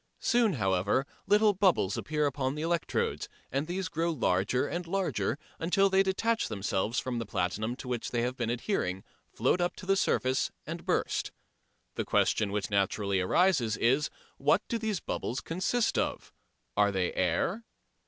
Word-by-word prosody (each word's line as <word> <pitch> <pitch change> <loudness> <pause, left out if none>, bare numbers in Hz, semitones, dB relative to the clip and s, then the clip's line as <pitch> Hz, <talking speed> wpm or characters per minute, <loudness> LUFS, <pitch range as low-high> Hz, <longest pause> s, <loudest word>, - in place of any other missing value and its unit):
Soon, 235 -4 +3
however, 100 - +1 0.2
little 210 0 +5
bubbles 180 - +2
appear 150 -1 -1
upon 135 -1 -1
the 150 - -3
electrodes, 170 0 -1 0.2
and 140 +4 -1
these 180 0 -2
grow 165 +1 -1
larger 120 - +1
and 175 +2 -4
larger, 190 -5 -1 0.2
until 195 +4 +3
they 190 0 +5
detach 220 +4 +1
themselves 100 +3 -1
from 125 -2 -1
the 115 - -3
platinum 105 +6 -1
to 130 - -9
which 125 -2 -2
they 120 -1 0
have 125 +1 -1
been 120 -3 -2
adhering, 115 - -1 0.3
float 180 - +1
up 175 - 0
to 185 - -10
the 195 +1 +3
surface 130 -8 +1 0.2
and - - -7
burst. - - 0 0.6
The - - -2
question 105 -3 +2
which 105 0 -2
naturally 100 0 +1
arises 120 - +2
is, 135 +5 +2 0.3
What 150 +8 +3
do 230 - -1
those 215 -4 -1
bubbles 125 - -3
consist 190 +8 0
of? - - -3 0.4
Are 105 0 +4
they 95 -2 -1
air? 95 - 0
140 Hz, 165 wpm, -30 LUFS, -, 0.6 s, little